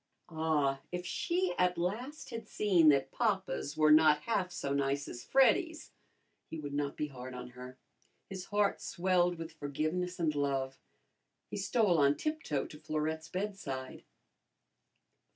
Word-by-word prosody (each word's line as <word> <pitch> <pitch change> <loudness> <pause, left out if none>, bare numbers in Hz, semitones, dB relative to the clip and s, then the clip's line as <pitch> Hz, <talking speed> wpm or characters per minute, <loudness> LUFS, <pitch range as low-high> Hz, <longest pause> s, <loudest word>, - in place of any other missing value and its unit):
Ah, 155 -4 +1
if 180 0 -4
she 350 - 0
at 180 0 +3
last 230 - -3
had 230 -2 -6
seen 180 -9 +4
that 135 -2 +3
papas 190 -9 -1
were 155 0 +5
not 155 -1 +6
half 195 -4 0
so 140 -5 -3
nice 140 0 0
as 120 - -7
Freddy's, 310 +5 +2 0.6
he 160 - -5
would 145 -2 -6
not 145 0 -2
be 150 - -2
hard 130 -1 -8
on 125 0 -7
her. 125 +1 -10 0.5
His 190 -2 -6
heart 205 -1 +1
swelled 180 -1 +1
with 165 0 -7
forgiveness 155 +5 -2
and 160 -3 +1
love. 135 -2 -1 0.7
He - - -3
stole 205 -9 +2
on 140 0 +4
tiptoe 305 - -2
to 150 - -11
Florette's 155 +1 -3
bedside. 180 -9 -4
160 Hz, 145 wpm, -32 LUFS, 140-190 Hz, 0.7 s, not